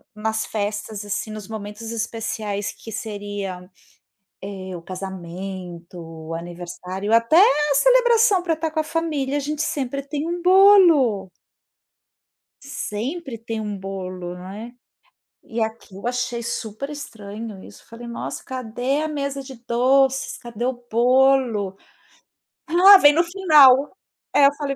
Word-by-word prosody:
nas 220 +1 -2
festas 210 0 -4
assim, 205 +1 -3
nos 215 -2 -8
momentos 215 +1 -7
especiais, 220 -3 -3
que 225 - -10
seria, 205 -4 -5 0.8
eh, 190 -2 -7
o - - -8
casamento, 180 -1 -7
o 165 0 -8
aniversário, 175 +4 -6
até 230 +6 +4
a 295 -6 +5
celebração 470 - +4
pra 330 -3 0
tá 320 0 -2
com 315 - -1
a 310 - -2
família, 300 -4 -2
a 290 - 0
gente 295 +2 -4
sempre 275 -4 -2
tem 290 +3 -4
um 345 +1 -3
bolo. 350 - +5 1.3
Sempre 265 +1 -5
tem 225 0 -5
um 210 -1 -4
bolo, 185 -2 -6
né. 205 +7 -9 0.7
E 230 0 -5
aqui 220 -3 -5
eu 200 - -8
achei 245 -1 -2
super 235 +3 -5
estranho 215 -7 -8
isso. - - -15
Falei: 235 +1 -10
"Nossa, 235 - -6
cadê 255 +2 -2
a 315 - -2
mesa 280 -2 -3
de 265 -1 -11
doces? 265 +2 +2
Cadê 235 -1 -6
o 245 -1 -4
bolo?". 245 -4 +3 0.9
"Ah, 370 +4 +8
vem 290 -5 +6
no 335 +3 +3
final". 300 -7 +5 0.5
É, 285 - +7
eu 280 - +1
falei 280 -2 -3
235 Hz, 135 wpm, -22 LUFS, 205-285 Hz, 1.3 s, Ah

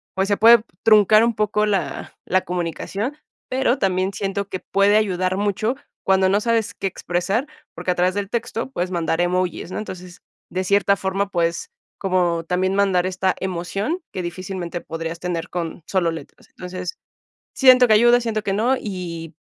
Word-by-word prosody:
pues, 190 +1 +1
se 205 - +2
puede 230 0 +7 0.2
truncar 215 0 +6
un 235 0 +2
poco 210 0 +1
la 200 -4 -2
la 185 0 +2
comunicación, 180 - -3 0.3
pero 260 0 +1
también 190 0 +1
siento 200 0 -3
que 185 - -4
puede 200 +3 +3
ayudar 185 -3 0
mucho 205 +4 0 0.3
cuando 190 0 +4
no 200 +2 +2
sabes 230 -1 0
qué 195 - -3
expresar, 185 +7 -1 0.3
porque 180 - -2
a - - -1
través 180 +1 +1
del 200 -1 -2
texto 235 +1 -3
puedes 180 -7 -2
mandar 170 -1 0
emojis. 180 -1 -1
¿no? - - -4
Entonces, 185 -4 -8 0.3
de 185 +1 -2
cierta 200 +1 +3
forma, 195 +1 -2
puedes 170 -2 -1 0.3
como 180 -3 +1
también 185 +2 0
mandar 195 -3 +2
esta 185 0 0
emoción 190 - -2
que 185 - -4
difícilmente 175 0 -5
podrías 165 +1 -5
tener 175 -2 -3
con 170 -1 -5
solo 185 -3 +1
letras. 160 -4 -10
Entonces, 185 - -7 0.6
siento 255 -2 +7
que 220 - +5
ayuda, 240 +3 +6
siento 220 -2 -2
que 200 - -1
no 235 +6 +2
y, 170 -5 -6
190 Hz, 170 wpm, -21 LUFS, 180-210 Hz, 0.6 s, puede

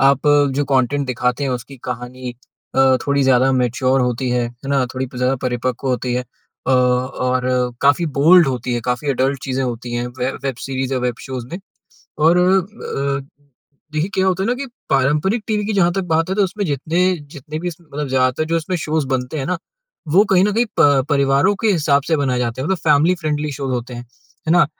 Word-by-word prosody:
आप 140 +2 +3 0.3
जो 145 - +1
कॉन्टेंट 135 +1 +1
दिखाते 125 +2 -1
हैं 135 - -1
उसकी 125 +2 -5
कहानी 125 0 -6 0.4
अ, 130 -1 +5
थोड़ी 140 0 +2
ज़्यादा 130 0 +4
मैच्योर 130 +1 +1
होती 125 +1 -1
है। 120 -1 +1
है 120 +3 -12
ना? 135 -2 +2
थोड़ी 130 0 -2
प 125 - -12
ज़्यादा 130 +2 +1
परिपक्व 125 +2 -2
होती 125 0 -1
है। 125 - 0 0.4
अ, - - +1
और 125 0 +1 0.4
काफ़ी 145 +5 +4
बोल्ड 170 +3 +7
होती 125 -2 -2
है। 120 - -1
काफ़ी 125 +4 -2
एडल्ट 135 +1 0
चीज़ें 135 -1 -2
होती 120 -1 -5
हैं। 120 0 -2
वे 125 +1 0
वेब 135 -3 -2
सीरीज़ 135 0 -3
या 130 - +1
वेब 125 -1 -1
शोज़ 130 -3 -6
में। 175 - -4 0.7
और 170 +2 +5
अ, 180 -7 0 0.7
देखिए 155 +5 -1
क्या 190 0 +2
होता 190 0 +1
है - - 0
ना 245 - +2
कि 275 +2 -5 0.2
पारंपरिक 150 - +2
टीवी 210 -1 0
की 215 - -1
जहाँ 175 -3 +3
तक 195 - 0
बात 165 +2 +1
है - - +1
तो 205 - +4
उसमें 200 +2 -3
जितने 155 +4 -1 0.3
जितने 150 +3 -7
भी 175 - -3
उसमे 170 -1 -10
मतलब 145 -1 -4
ज़्यादा 130 +3 +1
जो 165 +1 0
इसमें 165 +3 -2
शोज़ 155 -2 -1
बनते 130 +3 -2
हैं 135 - -3
ना। 180 +1 -1 0.5
वो 190 +7 +5
कहीं 185 0 +5
न 210 - +1
कहीं 235 +3 +2
प 140 -2 +5
परिवारों 140 +6 +3
के 225 - +3
हिसाब 145 -4 +2
से 160 - +3
बनाए 130 -3 0
जाते 120 0 -2
हैं। 135 - -2
मतलब 190 -2 0
फैमिली 160 +5 +3
फ्रेंडली 150 -3 -2
शोज़ 135 -1 -3
होते 125 0 -4
हैं। 120 - -6 0.5
है 160 - +4
ना? 170 -4 +5
135 Hz, 215 wpm, -19 LUFS, 125-160 Hz, 0.7 s, बोल्ड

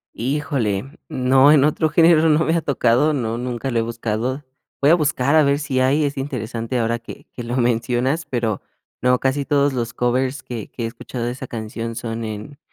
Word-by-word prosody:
Híjole, 130 -4 -1 0.2
no, 130 +2 +4
en 150 -3 +6
otro 155 +2 +2
género 165 +1 +5
no 155 +1 +3
me 160 - +1
ha 165 - +1
tocado, 140 +1 +2
no, 115 -4 -2
nunca 125 +1 -3
lo 115 - +1
he - - +2
buscado. 115 +4 -3 0.4
Voy 140 +2 +4
a - - +7
buscar 145 -4 +1
a 155 - +7
ver 140 0 +2
si 140 -3 -2
hay, 135 +4 +3
es 145 0 -3
interesante 125 -3 -3
ahora 115 0 0
que 115 - -11
que - - -7
lo 120 +2 -3
mencionas, 125 +5 0
pero 115 -5 -1 0.4
no, 125 +1 +3
casi 135 +2 0
todos 140 -1 +2
los 115 -3 -3
covers 130 +2 0
que 115 -4 -6
que 120 - -6
he - - 0
escuchado 115 +1 -5
de 120 - -1
esa 130 +1 -7
canción 115 0 -5
son 115 0 -4
en, 110 +6 -7
125 Hz, 205 wpm, -21 LUFS, 115-145 Hz, 0.4 s, a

